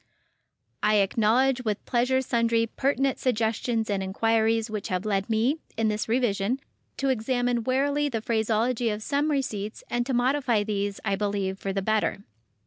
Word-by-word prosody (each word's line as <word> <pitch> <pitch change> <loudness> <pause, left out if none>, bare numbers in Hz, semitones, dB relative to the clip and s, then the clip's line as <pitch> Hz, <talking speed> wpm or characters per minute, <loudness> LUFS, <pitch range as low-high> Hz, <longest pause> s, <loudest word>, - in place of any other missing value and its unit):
I 215 0 +3
acknowledge 230 +6 +2
with 215 -3 -2
pleasure 260 +2 +1
sundry 230 -2 +2
pertinent 270 +3 0
suggestions 225 -1 0
and 200 -2 -1
inquiries 225 +3 +1
which 215 -3 -4
have 185 +1 -2
led 200 -1 0
me, 235 +8 +1 0.2
in 220 -1 +2
this 210 +1 -2
revision, 235 0 +1 0.4
to 275 - 0
examine 245 0 0
warily 285 +3 +1
the 230 -4 -2
phraseology 230 +2 +1
of 210 0 -3
some 290 +4 0
receipts 220 -8 -2
and 240 0 +1
to 265 - -1
modify 245 -3 +2
these, 205 -1 -2
I 195 -2 +1
believe, 200 -1 -2
for 195 - -3
the 195 0 -2
better. 215 -1 0
225 Hz, 155 wpm, -26 LUFS, 210-255 Hz, 0.4 s, I